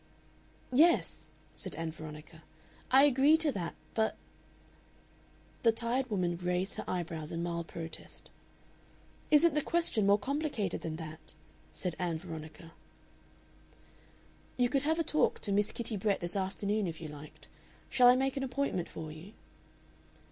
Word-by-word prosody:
"Yes," 330 +6 +3 0.2
said 185 -6 -4
Ann 165 +1 -3
Veronica, 155 +1 -10 0.5
"I 265 +2 +7
agree 285 +2 +5
to 320 -2 +1
that. 175 -8 -4 0.2
But 220 -1 +1 0.7
" - - -30
The 230 - +5
tired 240 +3 -1
woman 180 -5 0
raised 180 +2 -1
her - - -5
eyebrows 165 -3 -3
in 170 0 -2
mild 170 -1 -3
protest. 165 -1 -8 1.0
"Isn't 305 +1 +6
the 300 - +2
question 290 -12 +2
more 200 +1 +6
complicated 265 - -2
than 160 -1 -4
that?" 160 -1 -9 0.4
said 180 -3 -3
Ann 175 -3 -1
Veronica. 160 -1 -9 1.8
"You 245 -1 +3
could 275 0 +1
have 315 +3 +1
a 330 - +2
talk 310 - +2
to 205 - -1
Miss 205 +1 +2
Kitty 230 -2 -3
Brett 200 0 +1
this 175 +2 -2
afternoon, 200 +1 -1
if 165 -1 -5
you 160 - -6
liked. 150 0 -11 0.4
Shall 250 -2 +5
I 245 - +8
make 270 +1 0
an 270 - -2
appointment 265 -10 -1
for 155 -1 -7
you?" 165 +7 -11
195 Hz, 150 wpm, -32 LUFS, 165-260 Hz, 1.8 s, I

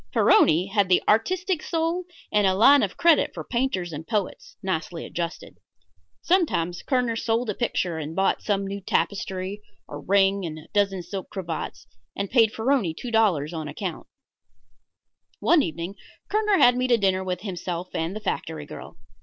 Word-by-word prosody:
Farroni 175 - +4
had 200 -3 +2
the 180 - +4
artistic 360 - +1
soul 335 +2 -1 0.3
and 210 -2 +3
a 190 - +2
line 275 +7 +7
of 195 - -2
credit 335 -2 +3
for - - -5
painters 235 -9 -2
and 155 +2 -7
poets, 210 -4 -3
nicely 170 -2 -3
adjusted. 170 0 -5 0.6
Sometimes 180 - +1
Kerner 250 -3 0
sold 225 0 0
a - - -4
picture 180 -7 -1
and 155 +1 -6
bought 195 +2 +1
some 200 -2 -1
new 200 +1 -5
tapestry, 195 +1 -2 0.3
a 145 - -7
ring 195 +3 +2
and 160 -2 -5
a 155 - -12
dozen 195 -3 +1
silk 190 +2 -6
cravats, 170 -5 -5 0.3
and 200 -1 -3
paid 225 -4 +5
Farroni 225 - 0
two 245 - -6
dollars 180 -9 +2
on 160 -2 -4
account. 165 +3 -5 1.3
One 340 -3 +4
evening 170 - -4 0.4
Kerner 425 -1 +2
had 245 -6 +6
me 255 0 +1
to 240 -2 +4
dinner 190 -3 +1
with 180 -1 -3
himself 180 -2 -5
and 165 +4 -2
the - - -4
factory 160 -6 -3
girl. - - -10
195 Hz, 165 wpm, -25 LUFS, 175-235 Hz, 1.3 s, line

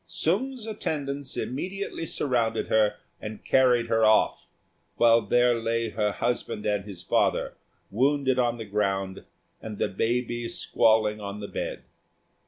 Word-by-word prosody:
Sung's 240 +8 -1
attendants 145 -10 -3
immediately 180 +5 -4
surrounded 115 -6 0
her 110 -1 +3 0.3
and 105 0 -8
carried 125 -3 +4
her 115 -1 +1
off, 110 0 +3 0.5
while 115 0 +5
there 120 +3 +3
lay 115 0 -1
her 105 -1 0
husband 115 -1 -2
and 105 -2 0
his 95 -4 -9
father, - - +1 0.4
wounded 130 +3 +2
on 120 -1 +1
the 115 - -6
ground 95 -2 -2 0.4
and 105 -2 -7
the - - +1
baby 120 +3 -1
squalling 110 -1 +2
on 100 0 -6
the 100 - -6
bed. - - -5
115 Hz, 135 wpm, -26 LUFS, 105-130 Hz, 0.5 s, while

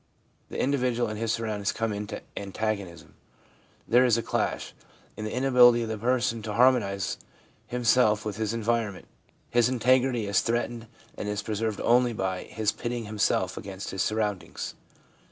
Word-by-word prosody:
The - - -5
individual 125 -3 +1
and 105 0 -5
his 115 -1 0
surroundings 110 -3 -1
come 115 -1 -2
into 105 +1 -5
antagonism. 100 -3 -4 0.7
There 120 +2 +5
is 120 -3 +4
a 115 - -1
clash. - - -2 0.4
In 105 - -5
the 110 - -3
inability 125 -2 +5
of 115 - -4
the' 110 - -2
person 120 0 +1
to 105 -1 -5
harmonise 105 -6 +2 0.5
himself 120 -3 +3
with 105 -1 -4
his 110 -1 -1
environment, 115 -3 -1 0.5
his 120 0 +4
integrity 125 -1 +2
is 100 -1 +2
threatened 120 0 -2 0.3
and 105 - -4
is 105 0 -2
preserved 110 0 -2
only 120 0 +3
by 95 -3 -2
his 110 -1 -1
pitting 120 -1 -4
himself 105 0 0
against 95 -1 -6
his 95 - -2
surroundings. 105 -3 -2
110 Hz, 155 wpm, -27 LUFS, 105-120 Hz, 0.7 s, There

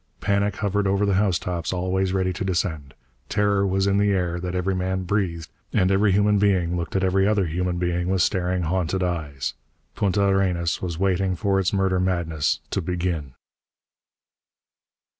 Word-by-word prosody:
Panic 100 0 0
hovered 105 -1 0
over 100 +1 +2
the 100 - +1
housetops, 90 -3 0
always 95 +1 0
ready 95 -1 0
to 95 - -4
descend. 85 -7 -2 0.3
Terror 100 -1 +2
was 95 0 +1
in 100 0 +2
the 100 0 +3
air 90 -3 0
that 90 0 -4
every 90 +1 0
man 95 0 -1
breathed, 90 -4 -1 0.3
and 95 +1 +3
every 100 +1 +3
human 105 +1 +3
being 95 -4 +2
looked 85 0 -4
at 95 - +1
every 95 +1 +2
other 105 -3 +2
human 90 +2 -2
being 90 0 -1
with 95 -2 +2
staring, 90 -1 0
haunted 90 +2 -1
eyes. 80 -6 -3 0.4
Punta 100 0 +1
Arenas 95 -4 +1
was 85 -3 -3
waiting 95 0 +1
for 100 0 +1
its 95 -1 +1
murder 95 -2 +1
madness 85 -5 0
to 100 - 0
begin. 85 -6 -3
95 Hz, 165 wpm, -24 LUFS, 90-100 Hz, 0.4 s, the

